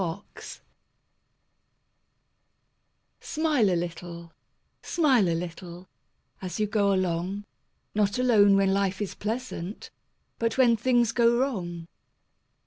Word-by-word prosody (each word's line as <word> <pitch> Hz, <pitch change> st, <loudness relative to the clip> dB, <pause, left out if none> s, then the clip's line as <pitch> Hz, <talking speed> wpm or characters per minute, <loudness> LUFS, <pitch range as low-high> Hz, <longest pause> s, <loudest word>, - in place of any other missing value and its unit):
SMILES 185 Hz, +3 st, -7 dB, 2.6 s
Smile 300 Hz, -9 st, +1 dB
a 180 Hz, -, +1 dB
little, 170 Hz, 0 st, -6 dB, 0.5 s
smile 265 Hz, -, +2 dB
a 165 Hz, -, +1 dB
little, 175 Hz, +1 st, -8 dB, 0.5 s
As 185 Hz, +2 st, -5 dB
you 215 Hz, -, +2 dB
go 205 Hz, -1 st, +1 dB
along, 185 Hz, +2 st, -1 dB, 0.5 s
Not 205 Hz, 0 st, +1 dB
alone 215 Hz, -6 st, +5 dB
when 195 Hz, -1 st, +3 dB
life 195 Hz, -1 st, 0 dB
is 205 Hz, -3 st, -3 dB
pleasant, 215 Hz, -4 st, -5 dB, 0.5 s
But 230 Hz, 0 st, -1 dB
when 245 Hz, -3 st, +5 dB
things 240 Hz, 0 st, +2 dB
go 235 Hz, 0 st, +3 dB
wrong. 180 Hz, -11 st, -2 dB
200 Hz, 105 wpm, -26 LUFS, 180-235 Hz, 2.6 s, alone